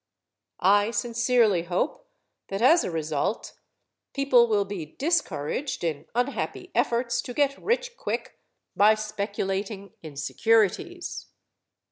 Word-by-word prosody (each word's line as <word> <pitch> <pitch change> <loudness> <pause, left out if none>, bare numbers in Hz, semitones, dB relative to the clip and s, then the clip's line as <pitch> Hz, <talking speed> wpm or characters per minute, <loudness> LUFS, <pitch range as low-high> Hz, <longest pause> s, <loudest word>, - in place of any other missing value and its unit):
I 205 +3 +5
sincerely 235 -5 +2
hope 255 - -2 0.4
that 195 - -3
as 315 +9 +5
a - - -2
result 160 -2 -2 0.6
people 260 -4 +5
will 205 -3 +2
be 195 -4 -5
discouraged 285 - -1
in 160 -4 -3
unhappy 245 +3 -2
efforts 235 0 +1
to 245 -1 -8
get 280 -1 +2
rich 480 +2 -1
quick - - -4 0.4
by 210 +2 +6
speculating 200 -2 -4
in 155 -3 -10
securities. 225 - 0
220 Hz, 110 wpm, -26 LUFS, 195-260 Hz, 0.6 s, by